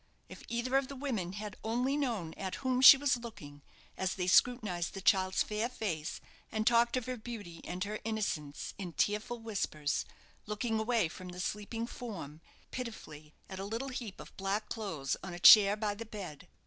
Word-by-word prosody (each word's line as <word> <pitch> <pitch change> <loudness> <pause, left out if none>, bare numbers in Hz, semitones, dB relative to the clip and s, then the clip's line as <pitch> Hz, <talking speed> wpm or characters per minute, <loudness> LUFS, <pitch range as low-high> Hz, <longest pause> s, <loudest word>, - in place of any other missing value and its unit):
If - - -10
either 235 +3 0
of 270 -1 0
the 275 - -7
women 230 -10 -3
had 205 0 -6
only 245 +5 0
known 230 - -2
at 190 -1 -4
whom 255 -1 +2
she 270 +1 +12
was 275 -2 +2
looking, 150 -12 -10 0.3
as 190 0 -1
they 180 - -2
scrutinized 200 -3 +2
the - - -4
child's 190 -1 +3
fair 215 +3 -2
face 170 -11 -3 0.3
and 215 0 -1
talked 235 +1 +4
of 250 - -2
her 255 0 -3
beauty 210 -8 -8
and 180 +1 -3
her 210 +1 -4
innocence 200 -10 -3
in 180 -4 -5
tearful 210 +9 0
whispers, 200 -10 -2 0.4
looking 220 +1 -1
away 225 -3 +2
from 180 +3 -10
the 180 0 -8
sleeping 210 +5 -3
form, 195 -12 -7 0.3
pitifully, 155 -11 -7
at 190 -1 -7
a - - -3
little 225 +7 -3
heap 235 -6 -6
of - - -11
black 195 +2 -2
clothes 165 - -3
on 180 -2 -6
a - - -8
chair 205 +2 +9
by 210 -1 -1
the 225 +3 -7
bed! 180 -6 -8
210 Hz, 185 wpm, -32 LUFS, 180-235 Hz, 0.4 s, she